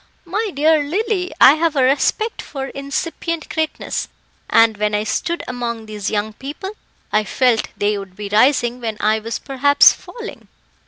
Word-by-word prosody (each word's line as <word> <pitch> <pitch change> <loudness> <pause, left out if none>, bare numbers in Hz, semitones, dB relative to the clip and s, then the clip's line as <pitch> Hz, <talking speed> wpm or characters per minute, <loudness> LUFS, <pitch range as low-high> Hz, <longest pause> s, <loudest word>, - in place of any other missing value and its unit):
My 410 +5 -2
dear 310 +1 +3
Lily, 370 +3 -1
I 270 - +9
have 320 0 0
a 270 - +3
respect 290 - +1
for 270 -1 -6
incipient 320 +4 -4
greatness, 315 -1 -2 0.4
and 225 -1 +5
when 210 0 0
I 210 - 0
stood 340 +9 -2
among 235 -2 -4
these 210 -2 -4
young 215 +1 -2
people, 295 - -7 0.4
I 215 0 +2
felt 235 +2 +1
they 205 0 0
would 195 -2 -10
be 205 0 -6
rising 240 +3 +2
when 220 -2 -3
I 215 +1 +2
was 225 +1 -4
perhaps 285 +1 +5
falling." 460 -2 -10
265 Hz, 160 wpm, -19 LUFS, 215-320 Hz, 0.4 s, I